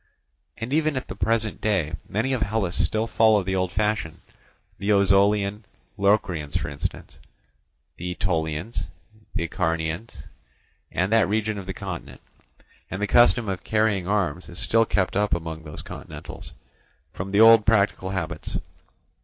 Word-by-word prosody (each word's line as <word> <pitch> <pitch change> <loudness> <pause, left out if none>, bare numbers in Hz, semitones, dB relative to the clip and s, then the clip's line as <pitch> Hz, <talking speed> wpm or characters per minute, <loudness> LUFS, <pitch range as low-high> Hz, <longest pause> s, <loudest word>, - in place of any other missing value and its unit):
And 120 +4 -4
even 155 -2 +2
at 130 - -4
the 95 - -6
present 110 +2 0
day 95 -8 0 0.2
many 120 +6 0
of 125 - -1
Hellas 100 -4 0
still 110 +1 +1
follow 110 -2 +4
the 95 +1 -1
old 95 -1 0
fashion, 105 -4 -1 0.6
the 100 +2 0
Ozolian 100 +1 +3 0.3
Locrians 95 -7 +1
for 70 - -3
instance, 70 - -6 0.8
the 90 - -4
Aetolians, 85 +1 -2 0.5
the - - 0
Acarnanians, 80 - -2 0.7
and 95 +3 0
that 110 -5 +4
region 110 0 0
of 95 - -9
the 95 - -4
continent; - - -7 0.7
and 95 - -4
the 105 - +1
custom 120 +1 +4
of 95 -2 -3
carrying 105 -4 +1
arms 95 -5 -1
is 85 - -9
still 115 +3 +3
kept 95 -2 0
up 105 -1 +2
among 80 -1 -6
these 75 - -7
continentals, - - -9 0.6
from 95 +2 -5
the 100 - +2
old 115 0 +8
piratical 100 -3 +2
habits. 85 -4 -4
100 Hz, 145 wpm, -24 LUFS, 90-110 Hz, 0.8 s, old